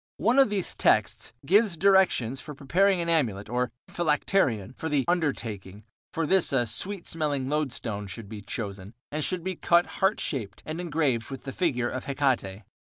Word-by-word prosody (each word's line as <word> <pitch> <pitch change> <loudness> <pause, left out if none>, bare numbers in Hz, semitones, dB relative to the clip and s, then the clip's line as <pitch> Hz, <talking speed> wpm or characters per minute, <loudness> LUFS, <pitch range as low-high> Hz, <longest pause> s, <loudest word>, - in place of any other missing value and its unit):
One 240 +6 +3
of 270 - +6
these 200 -3 -2
texts 110 +2 +2
gives 200 +1 +3
directions 185 - +3
for 150 - -9
preparing 185 +8 +2
an 170 - -3
amulet, 115 -12 0
or 125 +1 0 0.2
phylacterion, 150 - +1
for 160 - -4
the 145 -3 +1
"undertaking"; 110 - -2 0.3
for 165 - -1
this 190 +3 +3
a 130 -3 +2
"sweet 185 - -1
smelling" 145 -5 -1
loadstone 120 -8 -2
should 105 +2 -8
be 105 0 -8
chosen, 100 -2 -6 0.2
and 150 +1 -1
should 180 +1 -1
be 190 0 -3
cut 170 +1 +3 0.2
heart 190 +3 +3
shaped 110 - -4
and 160 +3 -4
engraved 150 -9 0
with 135 -1 -7
the 135 - -5
figure 130 -10 0
of 130 +1 -5
Hecate. 130 -8 -1
140 Hz, 175 wpm, -27 LUFS, 115-175 Hz, 0.3 s, of